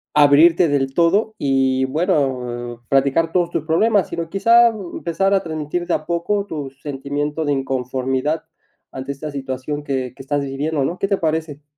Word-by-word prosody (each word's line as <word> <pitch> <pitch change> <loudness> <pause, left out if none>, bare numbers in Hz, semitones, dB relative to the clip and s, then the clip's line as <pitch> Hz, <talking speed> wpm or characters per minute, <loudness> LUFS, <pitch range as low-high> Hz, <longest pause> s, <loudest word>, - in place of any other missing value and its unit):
abrirte 155 +4 +6
del 135 -2 0
todo 195 +7 +2
y, 130 -1 +2
bueno, 130 -7 -1
platicar 140 +4 +2
todos 175 -2 +1
tus 165 -3 -3
problemas, 200 +5 +2
sino 170 -1 -4
quizá, 235 +4 +5
mm, 200 -6 -7
empezar 195 +4 0
a 195 - +3
transmitir 160 +2 -4
de - - 0
a 155 - -4
poco 200 +4 -1
tu 145 -7 -5
sentimiento 145 +2 -3
de 145 - +1
inconformidad 135 +3 -1 0.5
ante 135 +1 -5
esta 145 +2 -6
situación 140 +2 -4
que 130 -3 -3
que 135 - -11
estás 145 +1 -1
viviendo, 140 +1 -2
¿no?, 175 +5 -3
¿qué 195 - 0
te 200 -1 +1
parece? 155 -2 -2
150 Hz, 170 wpm, -20 LUFS, 135-170 Hz, 0.5 s, abrirte